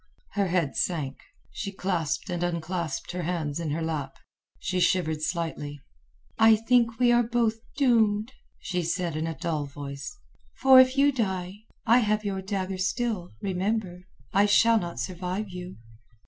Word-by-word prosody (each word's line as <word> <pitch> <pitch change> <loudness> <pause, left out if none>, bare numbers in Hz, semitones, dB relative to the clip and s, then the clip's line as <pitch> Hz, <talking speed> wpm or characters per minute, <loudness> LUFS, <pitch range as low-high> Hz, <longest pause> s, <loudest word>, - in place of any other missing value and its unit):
Her 200 -1 0
head 170 -6 0
sank. 150 -6 -1 0.3
She 200 - -5
clasped 180 -3 -2
and 175 -1 -2
unclasped 170 -1 -3
the 180 0 -3
hands 165 -3 -2
in 165 -2 -3
her 160 +3 -2
lap. 145 -4 -3 0.4
She 185 0 -2
shivered 170 -3 +1
slightly. 155 -3 -3 0.6
"I 220 0 +7
think 230 +1 +2
we 245 -1 +4
are 240 0 +5
both 230 -1 0 0.2
doomed," 225 -4 +2 0.2
she 180 0 -3
said 170 -1 -2
in 155 +1 -2
a 165 -3 -4
dull 155 -3 -2
voice. 140 - -7 0.4
"For 265 -1 +7
if 260 +1 +5
you 285 +1 +5
die, 195 -4 -3 0.2
I 235 +3 +6
have 215 -2 0
your 195 -1 -2
dagger 190 -1 -3
still, 200 -1 -1
remember. 190 -1 -2 0.3
I 200 +1 +4
shall 225 +2 +5
not 170 - -5
survive 185 - -3
you." 180 0 -8
185 Hz, 155 wpm, -27 LUFS, 170-220 Hz, 0.6 s, I